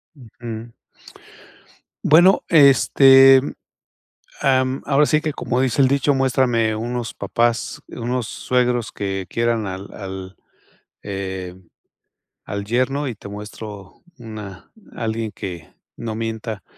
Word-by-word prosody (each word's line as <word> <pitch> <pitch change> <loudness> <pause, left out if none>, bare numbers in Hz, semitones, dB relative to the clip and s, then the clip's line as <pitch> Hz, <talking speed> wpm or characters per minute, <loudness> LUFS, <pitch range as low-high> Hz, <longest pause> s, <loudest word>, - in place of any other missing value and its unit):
Ujú. 115 -2 -9 1.3
Bueno, 175 +5 +5
este, 135 -3 +7 1.0
am, 130 0 +1
ahora 145 +1 +4
sí 155 +1 +2
que, 155 -2 -3
como 125 +1 -1
dice 130 +1 +2
el 130 - +4
dicho: 140 +1 +2
"Muéstrame 125 -4 +1
unos 120 +1 -4
papás, 120 0 -1
unos 120 -1 -3
suegros 125 0 -1
que 95 -2 -4
quieran 115 -2 0
al 95 +1 -7
al 95 -2 -8 0.7
eh, 95 -2 -5 0.9
al 100 0 -5
yerno 130 +5 0
y 120 - -3
te 100 - -12
muestro 105 -1 -9 0.2
una 105 -5 -10 0.2
alguien 110 -1 -3
que 90 -5 -8 0.3
no 115 -2 -5
mienta", 110 -2 -5
115 Hz, 110 wpm, -21 LUFS, 105-130 Hz, 1.3 s, este